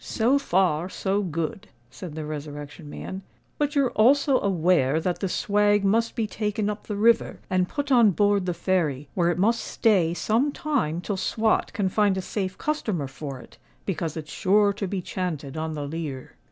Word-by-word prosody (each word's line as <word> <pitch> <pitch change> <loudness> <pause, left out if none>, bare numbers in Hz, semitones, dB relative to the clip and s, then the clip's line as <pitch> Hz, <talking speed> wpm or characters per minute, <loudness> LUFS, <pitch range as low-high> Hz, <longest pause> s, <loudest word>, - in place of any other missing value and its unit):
"So 250 +5 +2
far, 180 - +1
so 195 +2 -1
good," 185 +4 -3 0.2
said 150 +5 -8
the 155 -1 -4
Resurrection 145 0 -7
Man. 190 +5 -6 0.4
"But 295 0 0
you're 275 -3 +3
also 270 +4 +4
aware 165 -6 +2
that 175 +2 -2
the 195 - -2
swag 205 +1 +2
must 230 +4 +2
be 225 - 0
taken 210 0 -2
up 210 - -9
the 210 - -3
river 225 +3 +3
and 185 -1 +1
put 285 -1 -3
on 235 -4 +6
board 205 0 +2
the 180 - 0
Fairy, 155 -6 0
where 175 -2 +2
it 175 - 0
must 225 +5 +2
stay 180 -7 +2
some 235 +10 +1
time 255 - -1
till 200 +2 -3
Swot 220 +3 +1
can 200 -3 0
find 200 0 +2
a - - -1
safe 190 -2 -3
customer 215 - -2
for 135 -1 -7
it, - - -17 0.3
because 165 -4 -3
it's 155 -1 -7
sure 205 +1 +3
to 200 -1 -4
be 185 -1 -3
chanted 160 -8 -4
on 160 0 -3
the 145 -1 -4
leer." 145 -4 -6
190 Hz, 185 wpm, -25 LUFS, 160-215 Hz, 0.4 s, on